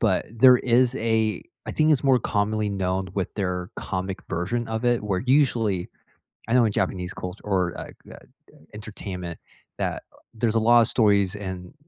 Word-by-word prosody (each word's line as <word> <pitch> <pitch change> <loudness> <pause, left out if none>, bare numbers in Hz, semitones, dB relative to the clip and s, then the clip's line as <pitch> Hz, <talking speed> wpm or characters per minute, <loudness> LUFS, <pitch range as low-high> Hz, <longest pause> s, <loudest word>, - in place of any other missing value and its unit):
but 105 -5 +1
there 125 +2 +6
is 125 +1 +2
a 110 -2 0 0.2
I - - -3
think 155 0 +2
it's 140 -1 +1
more 130 -2 +5
commonly 105 0 -1
known 95 -1 -2
with 95 -2 -2
their 90 -3 -3
comic 95 0 -4
version 115 +8 -2
of 110 +2 -3
it 120 -2 +2
where 95 -3 -1
usually 115 -9 +2 0.6
I - - -2
know 125 - +5
in 110 - +1
Japanese 90 -1 -2
culture 90 0 -7
or, 95 -4 0
like, - - -9
uh - - -10 0.4
uh, - - -19 0.2
entertainment 95 -5 -7 0.4
that, - - -2
uh, - - -22 0.2
there's 115 0 0
a - - +4
lot 120 +1 +6
of 115 - +4
stories 100 -3 +3
and 95 -3 -7
105 Hz, 180 wpm, -24 LUFS, 95-115 Hz, 0.6 s, there